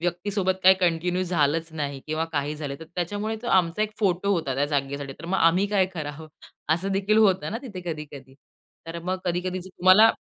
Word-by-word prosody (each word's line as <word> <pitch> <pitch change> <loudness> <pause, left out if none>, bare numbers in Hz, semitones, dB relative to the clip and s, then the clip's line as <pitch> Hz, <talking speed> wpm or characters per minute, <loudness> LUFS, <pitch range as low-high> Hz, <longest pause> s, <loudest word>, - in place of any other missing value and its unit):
व्यक्तीसोबत 185 +2 -1
काही 190 +1 +8
कंटिन्यू 180 +1 +1
झालंच 165 -2 0
नाही 145 -3 -4
किंवा 155 +1 -1
काही 145 0 -1
झालं 145 -2 -4
तर - - -7
त्याच्यामुळे 205 +5 -2
तो - - -6
आमचा 180 +2 +2
एक 215 - -1
फोटो 200 0 +2
होता 160 -8 -1
त्या 140 +2 +1
जागेसाठी. 140 -1 -2
तर 135 - -13
मग 190 +2 0
आम्ही 175 +4 +4
काय 200 -2 +2
करावं? 155 -1 -6 0.5
असं 190 +4 -3
देखील 200 +2 +2
होतं 195 -3 +3
ना 225 - -2
तिथे 205 -9 -7
कधी-कधी. 140 -4 -10 0.5
तर 165 +1 -5
मग 185 +2 -2
कधी-कधी 180 +1 -1
जर 190 - -11
तुम्हाला 185 +5 +6
175 Hz, 195 wpm, -25 LUFS, 155-190 Hz, 0.5 s, काही